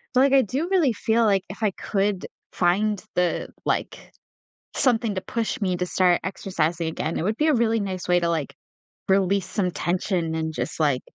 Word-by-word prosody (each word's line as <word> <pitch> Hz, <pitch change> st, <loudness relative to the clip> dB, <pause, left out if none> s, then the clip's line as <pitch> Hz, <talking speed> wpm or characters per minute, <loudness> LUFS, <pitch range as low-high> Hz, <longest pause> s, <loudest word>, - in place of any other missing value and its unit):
but, 255 Hz, -, +6 dB
like, 275 Hz, 0 st, +4 dB
I 270 Hz, -, +7 dB
do 270 Hz, -, -2 dB
really 315 Hz, -11 st, +3 dB
feel 225 Hz, +2 st, +1 dB
like 195 Hz, -3 st, +3 dB
if 205 Hz, -, -9 dB
I 205 Hz, -, +3 dB
could 195 Hz, 0 st, -1 dB, 0.3 s
find 200 Hz, +3 st, +1 dB
the, 180 Hz, -1 st, 0 dB, 0.2 s
like, -, -, -2 dB, 0.6 s
something 230 Hz, -5 st, +2 dB
to 185 Hz, -, -2 dB
push 230 Hz, +2 st, -3 dB
me 185 Hz, -2 st, 0 dB
to 180 Hz, -, -1 dB
start 180 Hz, -1 st, +3 dB
exercising 170 Hz, -3 st, -1 dB
again, 160 Hz, 0 st, -3 dB
it -, -, -2 dB
would 215 Hz, +4 st, -1 dB
be 310 Hz, -, +2 dB
a 305 Hz, -, +4 dB
really 225 Hz, -1 st, +2 dB
nice 185 Hz, -2 st, -4 dB
way 180 Hz, 0 st, +4 dB
to, 170 Hz, -, +1 dB
like, 160 Hz, -4 st, -2 dB, 0.6 s
release 195 Hz, 0 st, +2 dB
some 185 Hz, -4 st, -1 dB
tension 170 Hz, 0 st, -1 dB
and 160 Hz, 0 st, -2 dB
just, 165 Hz, -, -4 dB
like, 145 Hz, -5 st, +2 dB
195 Hz, 195 wpm, -24 LUFS, 175-220 Hz, 0.6 s, I